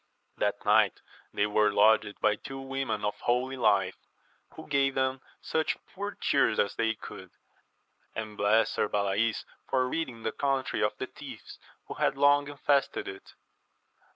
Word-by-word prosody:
That - - -1
night - - +4 0.3
they 105 - +1
were 105 0 +3
lodged 105 0 +3
by 105 -1 +3
two 135 +5 -8
women 135 -5 -3
of 105 - -2
holy 125 +2 0
life, 100 -6 +2 0.6
who 160 - -9
gave 140 -1 +2
them 130 0 0 0.2
such 160 0 0 0.2
poor 205 +1 -5
cheer 140 - +3
as 100 - +2
they 110 0 0
could, - - -10 0.9
and 110 -1 -5
blessed 105 +2 +3
Sir 105 - 0
Balays 100 +3 0 0.2
for 130 -1 +2
ridding 125 -6 -4
the 110 - -1
country 135 -2 -1
of - - 0
the - - -3
thieves - - -11 0.3
who - - -6
had - - 0
long 145 0 +4
infested 145 - 0
it. 395 0 -9
130 Hz, 155 wpm, -29 LUFS, 105-140 Hz, 0.9 s, night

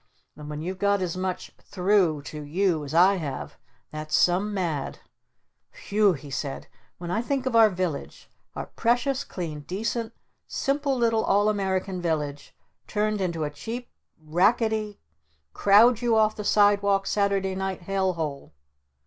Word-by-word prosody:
And 150 0 -9
when 150 +1 -5
you've 185 +2 -5
got 200 0 +2
as 180 -2 -2
much 185 0 -4
'through' 180 -6 +1
to 150 +1 -7
you 165 +1 0
as 140 - -7
I 185 +5 +5
have, 145 -6 -6 0.3
that's 155 0 -3
some 185 +4 +3
mad! 170 -8 -2 0.8
W - - -15
hew!" 205 -1 +4
he 145 -2 -9
said. 135 0 -4 0.3
"When 175 0 -6
I 220 - +1
think 265 +1 -2
of 260 -3 -1
our 225 -1 +7
village, 180 -6 -4 0.3
our - - -4
precious, 245 +3 0
clean, 160 -5 -6
decent, 220 - -3 0.4
simple 275 -1 -1
little 230 -2 +2
All 205 +1 +3
American 190 -2 -1
village 150 -4 -3 0.3
turned 210 -1 -1
into 170 -4 -1
a 145 - -2
cheap 230 +12 -7 0.3
racketty 210 +6 +1 0.6
crowd 220 +4 +5
you 235 -2 +2
off 215 -1 +3
the 210 - -5
sidewalk 200 -1 +3
Saturday 200 -2 0
Night 190 -1 -4
Hell 190 0 0
Hole...?" 150 -4 -5
190 Hz, 150 wpm, -26 LUFS, 165-215 Hz, 0.8 s, our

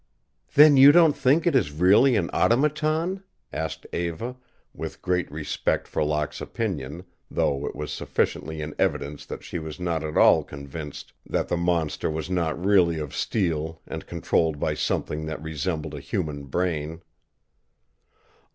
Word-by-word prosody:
"Then 150 -1 +8
you 135 +2 +10
don't 165 -2 +5
think 145 +7 +3
it 170 -5 +3
is 100 - +2
really 95 - +5
an 90 -5 0
automaton?" 155 +8 +1 0.3
asked 80 +1 -4
Eva, 85 +9 -3 0.4
with - - -7
great 90 -1 -1
respect 75 0 -2
for - - -1
Locke's 75 0 -2
opinion, 85 -7 -4 0.3
though 70 0 0
it - - -5
was 75 0 -5
sufficiently 80 0 -2
in 75 0 -5
evidence 70 0 -1
that - - -7
she - - -5
was 80 +2 -7
not 85 -3 -1
at 75 0 -3
all - - +6
convinced 70 +1 -8
that - - -2
the - - +1
monster 85 -3 0
was 80 +3 -4
not 85 -3 0
really 90 -3 +3
of 75 -3 -5
steel 80 -5 -1
and - - -7
controlled 80 -3 0
by - - 0
something 80 +1 -2
that 80 - -4
resembled 80 +1 -3
a - - -5
human 70 -2 -3
brain. 80 +1 -2
85 Hz, 150 wpm, -25 LUFS, 75-105 Hz, 0.4 s, you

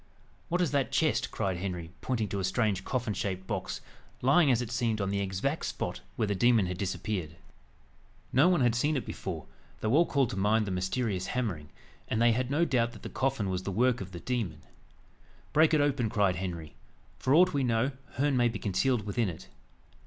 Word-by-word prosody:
"What 175 +1 +1
is 175 - +1
that 140 -2 +1
chest?" 155 -4 +1
cried 95 -4 -2
Henry, 90 -3 -4
pointing 115 -5 -1
to 100 - -2
a - - -2
strange 95 0 +1
coffin 120 -3 -1
shaped 95 -2 -3
box, - - -3 0.4
lying, 140 +4 +5
as 120 -3 +4
it 120 -2 -4
seemed, 115 -3 0
on 100 -1 -1
the 100 - 0
exact 100 - -1
spot - - -4
where 110 - 0
the 100 - +1
demon 115 +1 +4
had 90 0 -4
disappeared. 95 -4 -3 1.0
No 140 +8 +6
one 175 -5 +3
had 120 -2 +4
seen 145 +5 +1
it 130 - -3
before, - - -5 0.3
though 110 +2 0
all 165 +3 +5
called 135 -5 +1
to - - -4
mind 105 +3 +2
the 100 - -3
mysterious 95 +1 -1
hammering; 90 -12 -2 0.4
and 110 - -1
they 120 0 +5
had 125 +2 0
no 155 +5 +2
doubt 120 -5 +1
that 110 - -13
the - - -5
coffin 135 -6 -1
was 90 -1 -1
the 100 - -4
work 125 +4 +2
of 95 -1 -7
the 85 - -7
demon. 105 -9 -3 0.9
"Break 155 +1 +5
it 155 -2 +4
open," 140 -6 +1
cried 100 -4 +2
Henry; 85 -4 -5 0.5
"for 130 - +3
aught 180 +1 +6
we 140 -1 +1
know, 120 +2 +1 0.2
Herne 140 +1 +1
may 120 -1 +4
be 115 -2 -2
concealed 105 +3 0
within 105 0 0
it." 85 +1 -9
115 Hz, 205 wpm, -30 LUFS, 95-130 Hz, 1.0 s, No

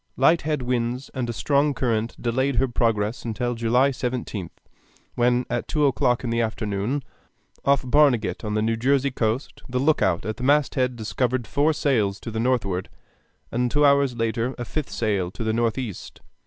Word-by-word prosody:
Light 160 +6 +4
head 150 -4 -2
winds 125 +1 -2
and 125 -3 -3
a - - -2
strong 140 +4 +1
current 115 -2 -1
delayed 130 +3 0
her 130 +3 +2
progress 115 -2 0
till 120 +3 -1
July 120 +4 +2
17th, 120 -8 -4 0.6
when 120 +1 +2
at 120 - -3
two 150 -1 +1
o'clock 125 -1 +2
in 120 - -2
the 115 0 +1
afternoon, 110 +4 -2 0.6
off 140 0 +3
Barnegat 130 -5 +3
on 105 -1 -2
the 110 - +1
New 115 +1 +1
Jersey 135 +3 +2
coast, 115 +2 -2
the 125 - -2
lookout 125 - +2
at 110 +1 -3
the - - -6
masthead 135 -2 +2
discovered 120 +2 -1
four 145 +8 +2
sails 120 -10 0
to 115 - -6
the 110 - -3
northward, 110 -7 0 0.6
and 125 +1 0
two 145 +4 +3
hours 140 -3 +4
later 115 +2 -1
a 120 - -4
fifth 150 +4 -4
sail 100 -6 -1
to 105 +5 -6
the 110 0 0
northeast. 115 -2 -3
120 Hz, 175 wpm, -24 LUFS, 115-135 Hz, 0.6 s, Light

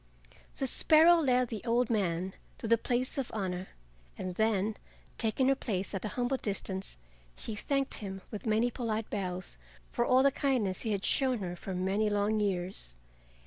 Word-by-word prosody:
The 270 - -1
sparrow 320 +6 +6
led 255 -6 +2
the 220 -4 -5
old 240 0 +2
man 185 -3 0 0.2
to 225 - -5
the 230 0 +4
place 255 +3 -1
of 265 - -2
honor, 185 -3 -2 0.5
and 185 -1 -4
then, 215 +1 +1 0.4
taking 230 +3 +1
her - - +6
place 200 -7 -3
at 195 - -3
a - - -1
humble 250 +2 +1
distance, 195 - -3 0.4
she 225 - -5
thanked 275 +5 -1
him 195 -2 -6
with 215 +1 -6
many 220 +3 +2
polite 225 -2 -3
bows 180 - -4 0.3
for 240 - +1
all 255 +2 +4
the 275 - +5
kindness 250 -10 0
he 225 - -1
had 200 -1 -1
shown 260 -2 +3
her 180 -4 -4
for 185 +2 -6
many 195 +4 +1
long 205 +1 +1
years. 185 - -1
215 Hz, 175 wpm, -31 LUFS, 190-245 Hz, 0.5 s, sparrow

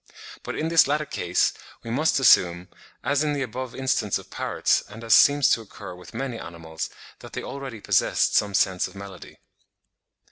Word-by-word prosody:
But - - -6
in 160 - -1
this 165 -3 +5
latter 150 +2 0
case 90 -9 0 0.3
we 115 - -6
must 145 +4 +2
assume, 90 -8 +4 0.3
as 145 +1 +1
in 150 -1 0
the 140 -2 -1
above 125 +1 -6
instance 130 -6 0
of - - -13
parrots, - - 0
and 110 +3 -10
as 115 -2 +3
seems 145 +3 +6
to 115 - +2
occur 100 -3 -10
with 90 -1 -13
many 130 -4 -4
animals, 80 -2 -7 0.3
that - - -12
they - - -4
already 135 -6 -7
possessed - - +2
some 100 -1 +2
sense 95 -2 +2
of - - -15
melody. 100 -1 -10
115 Hz, 180 wpm, -24 LUFS, 95-140 Hz, 0.3 s, seems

